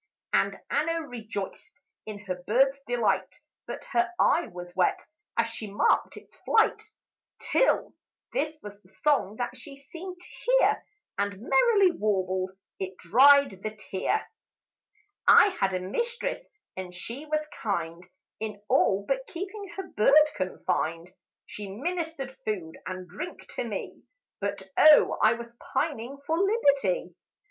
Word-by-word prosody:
And -, -, +2 dB
Anna 330 Hz, +1 st, 0 dB
rejoiced 230 Hz, -, -6 dB, 0.3 s
in 210 Hz, -1 st, -7 dB
her 180 Hz, -2 st, -4 dB
bird's 270 Hz, +5 st, +3 dB
delight; 240 Hz, -2 st, 0 dB, 0.3 s
But -, -, -6 dB
her 355 Hz, 0 st, +2 dB
eye 340 Hz, -, +3 dB
was 175 Hz, 0 st, -9 dB
wet, -, -, +2 dB, 0.4 s
as 230 Hz, 0 st, +3 dB
she 225 Hz, -2 st, -7 dB
marked 200 Hz, -, +2 dB
its -, -, -15 dB
flight; 445 Hz, -, +2 dB, 0.6 s
Till, -, -, +1 dB, 0.4 s
this 315 Hz, -11 st, -1 dB
was 205 Hz, 0 st, -10 dB
the 185 Hz, -, -25 dB, 0.2 s
song 265 Hz, -9 st, +3 dB
that 245 Hz, +1 st, -3 dB
she 275 Hz, +2 st, -11 dB
seemed 350 Hz, +6 st, -9 dB
to -, -, -14 dB, 0.2 s
hear; -, -, +3 dB, 0.4 s
And, 200 Hz, -1 st, -1 dB
merrily 380 Hz, -, +4 dB
warbled, 190 Hz, -, 0 dB, 0.3 s
it 190 Hz, -1 st, -5 dB
dried 260 Hz, +1 st, +5 dB
the 215 Hz, +1 st, -4 dB
tear: 195 Hz, -, -1 dB, 1.0 s
"I 415 Hz, -, +8 dB
had 195 Hz, -, +2 dB
a -, -, 0 dB
mistress, 475 Hz, -, -2 dB, 0.4 s
and 185 Hz, -1 st, -7 dB
she 250 Hz, +11 st, -7 dB
was 305 Hz, 0 st, 0 dB, 0.2 s
kind, 170 Hz, -5 st, -2 dB, 0.4 s
In 215 Hz, -2 st, -5 dB
all, 200 Hz, 0 st, +3 dB
but 265 Hz, -1 st, -1 dB
keeping 390 Hz, +3 st, -6 dB
her 385 Hz, -, -3 dB
bird 300 Hz, +6 st, +5 dB
confined; 180 Hz, -3 st, -2 dB, 0.3 s
She 205 Hz, -1 st, -8 dB
ministered 305 Hz, -, -4 dB
food 180 Hz, -7 st, -3 dB
and 185 Hz, -1 st, -6 dB
drink 210 Hz, -, -7 dB
to -, -, -2 dB
me, -, -, -6 dB, 0.4 s
But, 200 Hz, -1 st, -4 dB
O 310 Hz, -1 st, +7 dB
I 220 Hz, -, +6 dB
was 235 Hz, 0 st, -9 dB, 0.2 s
pining 275 Hz, -3 st, -1 dB
for 320 Hz, +3 st, 0 dB
liberty! 280 Hz, -, +2 dB
235 Hz, 135 wpm, -27 LUFS, 195-310 Hz, 1.0 s, I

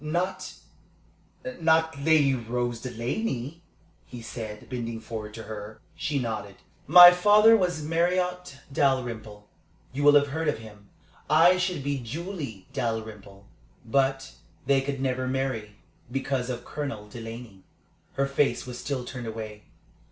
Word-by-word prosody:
"Not 185 Hz, +4 st, -2 dB, 1.1 s
not 160 Hz, -1 st, +2 dB
Lady 145 Hz, -2 st, +4 dB
Rose 120 Hz, -1 st, -3 dB
Delaney?" 125 Hz, -, -3 dB, 0.5 s
he 125 Hz, -, -9 dB
said, 110 Hz, -2 st, -7 dB
bending 115 Hz, -3 st, -4 dB
forward 110 Hz, -2 st, -7 dB
to 115 Hz, -, -7 dB
her. 105 Hz, 0 st, -8 dB, 0.2 s
She 145 Hz, -1 st, -2 dB
nodded. 110 Hz, -6 st, -4 dB, 0.3 s
"My 175 Hz, +3 st, +11 dB
father 210 Hz, +5 st, +6 dB
was 180 Hz, -6 st, 0 dB
Marriott 180 Hz, -1 st, -1 dB
Dalrymple. 115 Hz, -7 st, -1 dB, 0.5 s
You 140 Hz, -, -3 dB
will 145 Hz, 0 st, +6 dB
have 145 Hz, 0 st, +4 dB
heard 160 Hz, +3 st, -2 dB
of 150 Hz, -, +1 dB
him. 105 Hz, -2 st, -14 dB, 0.4 s
I 170 Hz, +4 st, +6 dB
should 180 Hz, -6 st, -1 dB
be 140 Hz, 0 st, -1 dB
Julie 140 Hz, -, -6 dB
Dalrymple, 110 Hz, -6 st, -5 dB, 0.4 s
but 135 Hz, +2 st, 0 dB, 0.3 s
they 140 Hz, -1 st, +3 dB
could 135 Hz, 0 st, -4 dB
never 130 Hz, -1 st, -1 dB
marry 130 Hz, -6 st, -2 dB, 0.4 s
because 135 Hz, -1 st, -2 dB
of 120 Hz, -1 st, -5 dB
Colonel 140 Hz, -8 st, -5 dB
Delaney." 115 Hz, -3 st, -9 dB, 0.5 s
Her 140 Hz, -, +1 dB
face 140 Hz, -2 st, 0 dB
was 125 Hz, -1 st, -7 dB
still 130 Hz, -3 st, -3 dB
turned 125 Hz, -2 st, -7 dB
away. 110 Hz, -1 st, -7 dB
130 Hz, 130 wpm, -26 LUFS, 115-155 Hz, 1.1 s, My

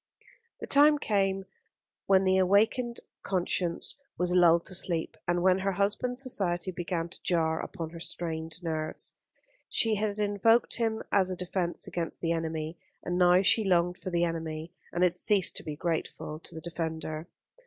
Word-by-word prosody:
The -, -, -4 dB
time 295 Hz, +1 st, +6 dB
came 195 Hz, -6 st, 0 dB, 0.6 s
when 195 Hz, -1 st, +5 dB
the 190 Hz, 0 st, +3 dB
awakened 220 Hz, +6 st, +2 dB, 0.2 s
conscience 180 Hz, -2 st, 0 dB, 0.2 s
was 180 Hz, 0 st, 0 dB
lulled 170 Hz, -2 st, +5 dB
to -, -, 0 dB
sleep, 170 Hz, -3 st, +2 dB
and 175 Hz, 0 st, +1 dB
when 185 Hz, 0 st, +4 dB
her 195 Hz, 0 st, -1 dB
husband's 210 Hz, +7 st, -1 dB
society 185 Hz, -7 st, 0 dB
began 170 Hz, -1 st, -3 dB
to 170 Hz, -, -9 dB
jar 165 Hz, -4 st, +1 dB
upon 165 Hz, -1 st, -6 dB
her 170 Hz, -, -9 dB
strained 165 Hz, 0 st, -4 dB
nerves. 155 Hz, -2 st, -3 dB, 0.6 s
She 225 Hz, -1 st, +3 dB
had 210 Hz, 0 st, -2 dB
invoked 210 Hz, +3 st, +2 dB
him 225 Hz, -2 st, -1 dB
as 190 Hz, -2 st, +3 dB
a 185 Hz, -, -3 dB
defence 180 Hz, -1 st, -2 dB
against 170 Hz, -2 st, -4 dB
the 165 Hz, -, -1 dB
enemy; 160 Hz, 0 st, -3 dB, 0.2 s
and 175 Hz, -, -2 dB
now 180 Hz, +1 st, +5 dB
she 220 Hz, +3 st, +5 dB
longed 180 Hz, -2 st, +1 dB
for -, -, -5 dB
the 175 Hz, -1 st, +1 dB
enemy, 165 Hz, -1 st, -4 dB, 0.2 s
and 175 Hz, -, 0 dB
had 180 Hz, 0 st, +1 dB
ceased 200 Hz, -2 st, +3 dB
to -, -, -4 dB
be 150 Hz, -, -5 dB
grateful 155 Hz, -1 st, -4 dB
to -, -, -6 dB
the 160 Hz, -, -7 dB
defender. 160 Hz, -1 st, -5 dB
180 Hz, 165 wpm, -29 LUFS, 165-195 Hz, 0.6 s, time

